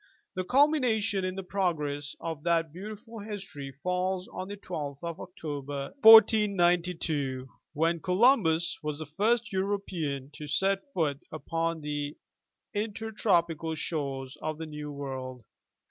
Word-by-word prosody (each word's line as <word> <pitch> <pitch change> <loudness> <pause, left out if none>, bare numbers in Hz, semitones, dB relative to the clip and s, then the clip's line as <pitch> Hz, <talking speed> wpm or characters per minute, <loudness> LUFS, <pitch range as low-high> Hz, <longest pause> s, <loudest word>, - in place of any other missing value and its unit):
The 185 - -2
culmination 250 -6 +3
in 185 0 -2
the 195 - -4
progress 150 -7 -1
of 160 -3 -4
that 165 -1 +1
beautiful 215 +5 -8
history 195 -10 -7
falls 180 +1 -1
on 185 - -6
the 205 +1 -6
12th 145 -7 -6
of 170 -1 -4
October, 145 -6 -5
1492, 175 - +5 0.3
when 165 +2 +1
Columbus 180 - +3
was 150 -1 -3
the 155 - -6
first 215 +8 +1
Euro 195 +2 +1
pean 145 -8 -4
to 150 0 -8
set 195 - +1
foot 145 -5 +1
upon 165 +1 -2
the 145 0 -3 0.6
intertropical 200 -7 0
shores 140 -3 -3
of 155 -1 -3
the 160 - -5
New 150 -1 -6
World. 130 -3 -6
170 Hz, 130 wpm, -29 LUFS, 150-200 Hz, 0.6 s, 1492